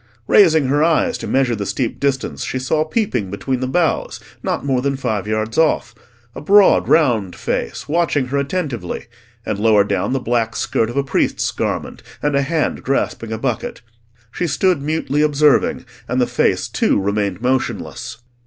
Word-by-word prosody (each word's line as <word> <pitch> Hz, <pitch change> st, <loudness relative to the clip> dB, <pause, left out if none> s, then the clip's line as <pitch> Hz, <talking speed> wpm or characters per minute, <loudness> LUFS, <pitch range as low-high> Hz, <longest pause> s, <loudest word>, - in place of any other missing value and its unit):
Raising 160 Hz, -7 st, +5 dB
her 145 Hz, +3 st, +2 dB
eyes 170 Hz, -, +2 dB
to -, -, -5 dB
measure 130 Hz, -3 st, +1 dB
the 100 Hz, -, -4 dB
steep 125 Hz, -4 st, -2 dB
distance, 140 Hz, -2 st, -1 dB
she -, -, -3 dB
saw 150 Hz, +4 st, 0 dB
peeping 155 Hz, -, -1 dB
between 125 Hz, +6 st, -2 dB
the 130 Hz, -, -2 dB
boughs, 165 Hz, +4 st, 0 dB, 0.2 s
not -, -, -2 dB
more 130 Hz, -3 st, +1 dB
than 140 Hz, +1 st, 0 dB
five 110 Hz, -7 st, -2 dB
yards 110 Hz, +4 st, -1 dB
off, 120 Hz, -7 st, +2 dB, 0.4 s
a -, -, -8 dB
broad 200 Hz, +5 st, +5 dB
round 115 Hz, -, +2 dB
face, -, -, -3 dB
watching 150 Hz, -4 st, +1 dB
her 140 Hz, +1 st, 0 dB
attentively, 140 Hz, -, -3 dB, 0.4 s
and -, -, -2 dB
lower 105 Hz, -1 st, +4 dB
down 100 Hz, 0 st, -1 dB
the 135 Hz, -, +1 dB
black 115 Hz, -2 st, -1 dB
skirt 115 Hz, -, 0 dB
of 120 Hz, -, -6 dB
a 140 Hz, -, +2 dB
priest's 135 Hz, -, 0 dB
garment, -, -, -3 dB, 0.2 s
and 145 Hz, -1 st, 0 dB
a 140 Hz, -, +3 dB
hand 155 Hz, +3 st, -1 dB
grasping 120 Hz, -4 st, -2 dB
a 110 Hz, -, -2 dB
bucket. 120 Hz, 0 st, -3 dB, 0.5 s
She 175 Hz, -, -2 dB
stood 170 Hz, +1 st, +1 dB
mutely 150 Hz, -1 st, -1 dB
observing, 150 Hz, -1 st, +2 dB, 0.2 s
and -, -, -1 dB
the -, -, +4 dB
face, -, -, 0 dB
too, -, -, +1 dB
remained 100 Hz, -1 st, -1 dB
motionless. 125 Hz, -1 st, -2 dB
135 Hz, 170 wpm, -19 LUFS, 115-150 Hz, 0.5 s, Raising